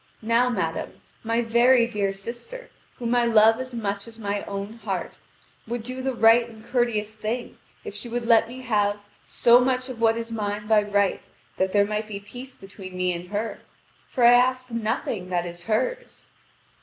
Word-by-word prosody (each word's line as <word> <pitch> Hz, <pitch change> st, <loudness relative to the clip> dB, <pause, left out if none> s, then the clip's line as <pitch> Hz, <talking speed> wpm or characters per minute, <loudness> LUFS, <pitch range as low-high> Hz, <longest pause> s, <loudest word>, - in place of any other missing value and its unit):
Now, 230 Hz, +3 st, +3 dB
madame, 165 Hz, -9 st, -3 dB, 0.2 s
my 230 Hz, +1 st, +1 dB
very 235 Hz, +2 st, +4 dB
dear 205 Hz, -4 st, -1 dB
sister, 240 Hz, -, -8 dB, 0.3 s
whom 240 Hz, -2 st, -2 dB
I 240 Hz, -1 st, +3 dB
love 225 Hz, 0 st, +5 dB
as 255 Hz, 0 st, -5 dB
much 200 Hz, -2 st, -3 dB
as 225 Hz, -1 st, -12 dB
my 205 Hz, -2 st, -3 dB
own 200 Hz, +3 st, -6 dB
heart, -, -, -4 dB, 0.5 s
would 235 Hz, 0 st, -4 dB
do 255 Hz, +2 st, -5 dB
the 265 Hz, -1 st, -2 dB
right 230 Hz, +1 st, +5 dB
and 220 Hz, -1 st, -14 dB
courteous 220 Hz, -4 st, 0 dB
thing 220 Hz, +3 st, -4 dB, 0.2 s
if 425 Hz, -, -7 dB
she 240 Hz, -, -8 dB
would 240 Hz, 0 st, -3 dB
let 225 Hz, -1 st, +5 dB
me 255 Hz, +1 st, -8 dB
have 205 Hz, -3 st, +1 dB, 0.3 s
so 240 Hz, 0 st, +5 dB
much 255 Hz, 0 st, 0 dB
of 240 Hz, -3 st, -7 dB
what 225 Hz, 0 st, +4 dB
is 230 Hz, 0 st, -5 dB
mine 210 Hz, -1 st, -3 dB
by 215 Hz, -1 st, +4 dB
right 200 Hz, -1 st, +1 dB, 0.4 s
that 190 Hz, 0 st, +1 dB
there 205 Hz, 0 st, +4 dB
might 210 Hz, +1 st, -3 dB
be 205 Hz, -2 st, -6 dB
peace 245 Hz, +6 st, -10 dB
between 195 Hz, -1 st, -10 dB
me 180 Hz, 0 st, +1 dB
and 175 Hz, +1 st, -7 dB
her; 210 Hz, +3 st, -3 dB, 0.5 s
for 250 Hz, -, -1 dB
I 240 Hz, +1 st, +8 dB
ask 255 Hz, +1 st, +3 dB
for -, -, -11 dB
nothing 220 Hz, -4 st, -2 dB
that 175 Hz, -1 st, 0 dB
is 175 Hz, 0 st, -7 dB
hers." 255 Hz, -, -2 dB
225 Hz, 190 wpm, -24 LUFS, 205-245 Hz, 0.5 s, I